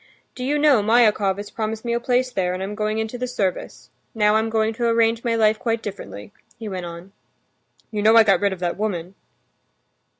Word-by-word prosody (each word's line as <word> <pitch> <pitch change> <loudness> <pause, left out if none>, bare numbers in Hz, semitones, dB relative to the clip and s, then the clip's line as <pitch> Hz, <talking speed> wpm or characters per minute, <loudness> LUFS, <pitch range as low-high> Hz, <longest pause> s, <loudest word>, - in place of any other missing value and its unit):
Do 250 - -7
you 285 +3 0
know, 290 -6 +4
Myakov 210 -3 +3
has 205 0 -7
promised 220 0 -4
me 235 - -1
a 235 - 0
place 250 +1 0
there, 185 -5 -1
and 185 - -4
I'm 200 +2 -5
going 215 0 -2
into 220 +2 -4
the 250 - -2
service. 195 -7 -4 0.2
Now 210 -1 +3
I'm 220 +1 +1
going 220 0 0
to 235 +1 -1
arrange 230 0 +2
my 235 -1 0
life 215 -1 +2
quite 230 -1 -2
differently," 190 - -8 0.2
he 225 - -7
went 185 -3 -5
on. 170 +3 -10 0.8
"You 210 -2 -2
know 220 +2 +5
I 225 - +8
got 195 -4 +3
rid 200 -1 +2
of 190 -2 -7
that 175 -1 -2
woman." 190 -4 -3
220 Hz, 210 wpm, -22 LUFS, 195-230 Hz, 0.8 s, I